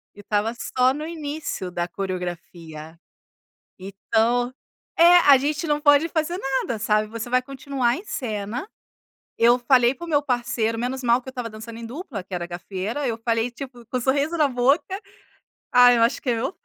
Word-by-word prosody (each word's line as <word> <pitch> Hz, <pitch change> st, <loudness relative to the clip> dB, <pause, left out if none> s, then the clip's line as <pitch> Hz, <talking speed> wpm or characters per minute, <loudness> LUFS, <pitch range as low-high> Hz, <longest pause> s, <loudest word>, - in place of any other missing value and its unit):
E -, -, -16 dB
estava 210 Hz, +2 st, -1 dB
só 255 Hz, +1 st, +1 dB
no 300 Hz, +3 st, -5 dB
início 300 Hz, -, -5 dB
da 175 Hz, 0 st, -2 dB
coreografia. 170 Hz, -4 st, -6 dB, 0.8 s
Então 225 Hz, +6 st, 0 dB, 0.4 s
é, 345 Hz, +1 st, +7 dB
a 280 Hz, -, +10 dB
gente 295 Hz, +4 st, -1 dB
não 295 Hz, -1 st, 0 dB
pode 290 Hz, +2 st, +5 dB
fazer 330 Hz, +2 st, -2 dB
nada, 265 Hz, -, -2 dB
sabe. 215 Hz, 0 st, +1 dB
Você 230 Hz, +2 st, -6 dB
vai 255 Hz, +1 st, +2 dB
continuar 270 Hz, -2 st, -1 dB
em 375 Hz, -, -9 dB
cena. 230 Hz, -, -4 dB, 0.7 s
Eu 240 Hz, +2 st, +5 dB
falei 245 Hz, 0 st, +4 dB
para 310 Hz, -, -9 dB
o -, -, -10 dB
meu 295 Hz, -3 st, +2 dB
parceiro 240 Hz, -4 st, -1 dB
menos 255 Hz, +2 st, -3 dB
mal 240 Hz, 0 st, +3 dB
que 260 Hz, -, -14 dB
eu -, -, -3 dB
estava 245 Hz, -3 st, -5 dB
dançando 225 Hz, +1 st, -9 dB
em 235 Hz, -, -8 dB
dupla, 250 Hz, -, -7 dB
que 185 Hz, -, -22 dB
era 175 Hz, -1 st, -3 dB
Gafieira. 190 Hz, +9 st, -4 dB
Eu 230 Hz, -2 st, -2 dB
falei, 230 Hz, +1 st, 0 dB
tipo, 245 Hz, -1 st, -10 dB
com 255 Hz, +2 st, -2 dB
sorriso 280 Hz, +6 st, +1 dB
na 305 Hz, -3 st, +4 dB
boca: 280 Hz, +9 st, +1 dB, 0.7 s
"Ai, 245 Hz, 0 st, +7 dB
eu 230 Hz, -, +2 dB
machuquei 240 Hz, +1 st, +1 dB
meu 260 Hz, +8 st, -2 dB
pé, -, -, -46 dB
245 Hz, 180 wpm, -23 LUFS, 220-280 Hz, 0.8 s, a